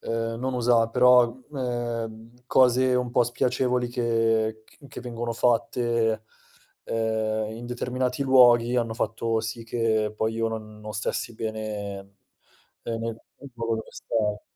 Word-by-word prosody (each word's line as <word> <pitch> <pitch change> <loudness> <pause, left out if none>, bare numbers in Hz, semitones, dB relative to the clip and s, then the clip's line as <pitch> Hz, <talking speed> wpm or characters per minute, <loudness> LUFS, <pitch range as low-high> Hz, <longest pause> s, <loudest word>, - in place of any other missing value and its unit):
ehm, 115 0 -2
non 130 +1 -2
usa 120 -2 +3
però 125 0 +5 0.2
ehm, 115 -3 -4
cose 130 0 +4
un 125 -1 0
po' 125 - +4
spiacevoli 125 +1 0
che 115 -2 +1
c - - -24
che 135 - -9
vengono 120 -1 -4
fatte, 115 -1 +1 0.6
ehm, 110 -1 -1
in 120 +1 -8
determinati 125 +2 -2
luoghi 125 -2 +5
hanno 115 -2 0
fatto 115 -1 -1
sì 110 +1 -5
che 110 -2 0
poi 110 0 -1
io 115 0 0
non 110 -1 -7
non 105 0 -7
stessi 115 +2 -3
bene, 110 -2 -4 0.8
ehm, 115 -1 -3
nel 115 0 -4 0.3
luogo 115 -1 -1
dove 110 - -7
stavo. 105 -2 -2
115 Hz, 135 wpm, -26 LUFS, 110-120 Hz, 0.8 s, però